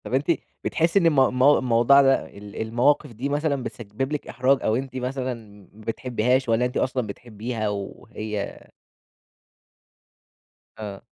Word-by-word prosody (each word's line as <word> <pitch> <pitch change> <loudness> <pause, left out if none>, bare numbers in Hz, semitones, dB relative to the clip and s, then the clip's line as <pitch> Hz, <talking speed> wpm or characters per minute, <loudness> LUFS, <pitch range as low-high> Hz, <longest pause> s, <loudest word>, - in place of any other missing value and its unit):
طب، - - -7
أنتِ 135 +2 +1 0.4
بتحسي 170 +4 +2
إن 175 - +1
المو 145 -5 +5
المو 130 +3 +5
الموضوع 125 +3 +5
ده 135 -1 +3
ال 100 +1 -7
المواقف 125 +6 +2
دي 125 +6 -3
مثلًا 145 -2 0
بتسبب 120 +5 -5
لِك 150 - -3
إحراج 130 +3 +2
أو 110 - +2
أنتِ 130 +1 -4
مثلًا 130 0 -2 0.4
ما 110 - -16
بتحبيهاش 125 +2 0
والّا 115 +2 +3
أنتِ 125 - -2
أصلًا 125 -3 0
بتحبيها؟ 110 +1 -4
وهي 105 +1 -5 2.1
آه. 105 -3 -7
125 Hz, 140 wpm, -24 LUFS, 110-135 Hz, 2.1 s, المو